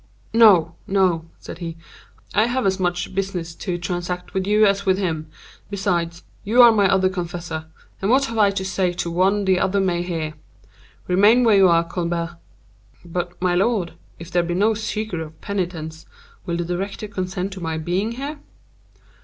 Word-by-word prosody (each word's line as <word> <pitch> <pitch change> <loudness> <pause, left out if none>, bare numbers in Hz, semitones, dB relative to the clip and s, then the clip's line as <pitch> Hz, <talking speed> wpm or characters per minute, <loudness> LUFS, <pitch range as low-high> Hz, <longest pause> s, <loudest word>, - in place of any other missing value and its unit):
"No, 195 -8 +6
no," 185 -4 +2
said - - -10
he; 165 -2 -6 0.6
"I 215 +2 +4
have 250 0 -1
as 190 0 +1
much 175 0 -1
business 185 -4 -3
to 180 0 -4
transact 180 +1 -4
with 190 -1 -1
you 210 +1 +5
as 200 -1 +2
with 190 -1 +2
him. 160 -5 -2 0.4
Besides, 175 -4 -1 0.2
you 225 +5 +1
are 235 - +9
my 200 -4 +3
other 190 -1 +3
confessor—and 175 0 -5
what 265 0 +3
I 220 -2 +4
have 200 0 0
to 190 - -2
say 190 -2 0
to 170 -1 -3
one 195 +4 +2
the 190 -1 +3
other 195 +1 +1
may 180 -3 +1
hear. 165 -3 -3 0.7
Remain 205 +7 +5
where 225 -3 +5
you 190 -1 +7
are, 170 0 +4
Colbert." 170 0 -3 0.7
"But 175 +1 -4
my 180 -1 +1
lord, 190 -2 +1 0.2
if 170 +2 -10
there 175 - +3
be 175 0 -2
no 210 +4 +3
secret 215 -4 -3
of 160 0 -9
penitence, 170 -5 -4 0.4
will 170 -1 -1
the 175 - -2
director 195 +4 -4
consent 190 -1 -4
to 190 - -9
my 160 -1 -2
being 180 +8 -1
here?" 285 +4 -5
185 Hz, 175 wpm, -22 LUFS, 170-200 Hz, 0.7 s, are